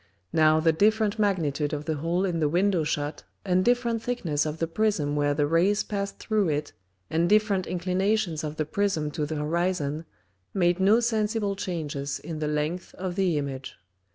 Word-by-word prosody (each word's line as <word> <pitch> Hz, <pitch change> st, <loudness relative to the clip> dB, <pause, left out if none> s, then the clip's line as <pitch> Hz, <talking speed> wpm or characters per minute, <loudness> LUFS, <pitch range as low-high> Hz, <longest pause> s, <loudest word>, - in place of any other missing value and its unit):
Now 155 Hz, 0 st, +5 dB
the 165 Hz, +1 st, +4 dB
different 215 Hz, +4 st, +2 dB
Magnitude 155 Hz, -8 st, 0 dB
of 150 Hz, 0 st, -3 dB
the 160 Hz, -2 st, -1 dB
hole 170 Hz, +5 st, 0 dB
in 175 Hz, -3 st, -1 dB
the 150 Hz, -2 st, +2 dB
Window 180 Hz, +1 st, +2 dB
shut, 150 Hz, -1 st, -2 dB, 0.2 s
and 185 Hz, -1 st, +2 dB
different 240 Hz, -1 st, +1 dB
thickness 170 Hz, -12 st, -1 dB
of 155 Hz, +1 st, -4 dB
the 165 Hz, -, 0 dB
Prism 165 Hz, -5 st, 0 dB
where 145 Hz, 0 st, +1 dB
the 145 Hz, 0 st, +2 dB
Rays 175 Hz, +7 st, +2 dB
passed 200 Hz, -1 st, -4 dB
through 215 Hz, -5 st, 0 dB
it, 150 Hz, 0 st, -2 dB, 0.4 s
and 170 Hz, +2 st, +2 dB
different 210 Hz, -3 st, +3 dB
inclinations 185 Hz, -1 st, 0 dB
of 150 Hz, 0 st, -4 dB
the 155 Hz, -, -1 dB
Prism 160 Hz, -3 st, -1 dB
to 150 Hz, 0 st, -2 dB
the 155 Hz, -, -3 dB
Horizon, 160 Hz, 0 st, -1 dB, 0.5 s
made 175 Hz, -1 st, +2 dB
no 205 Hz, +5 st, +5 dB
sensible 215 Hz, -3 st, 0 dB
changes 155 Hz, -7 st, -3 dB
in 160 Hz, -2 st, -6 dB
the 155 Hz, -, -1 dB
length 150 Hz, +4 st, -2 dB
of 185 Hz, -1 st, -4 dB
the 185 Hz, -5 st, +1 dB
Image. 135 Hz, -2 st, -4 dB
170 Hz, 180 wpm, -26 LUFS, 150-200 Hz, 0.5 s, Now